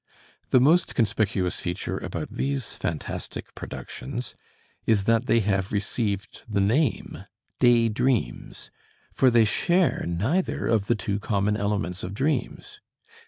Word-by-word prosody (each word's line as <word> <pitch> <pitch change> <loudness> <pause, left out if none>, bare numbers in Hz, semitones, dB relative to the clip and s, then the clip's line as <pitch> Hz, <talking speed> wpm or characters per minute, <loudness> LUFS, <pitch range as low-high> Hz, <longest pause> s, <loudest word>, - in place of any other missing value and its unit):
The 130 - +5
most 160 +8 +3
conspicuous 100 -5 0
feature 90 +2 -3
about - - -5
these 135 -1 -2
phantastic 80 -4 -5
productions 125 -2 -6 0.5
is 110 -3 +3
that 115 +3 +2
they 115 -2 +4
have 95 -1 0
received 105 0 -2
the 100 -2 0
name 115 +7 0 0.3
"day 120 -1 +5
dreams," 120 +2 -1 0.4
for 130 - +4
they 115 -2 +5
share 175 - +2
neither 110 - 0
of 110 -3 +1
the 120 - +3
two 100 -2 -2
common 105 0 0
elements 100 -4 -2
of 95 +2 -5
dreams. 140 +3 -2
110 Hz, 125 wpm, -25 LUFS, 100-125 Hz, 0.5 s, The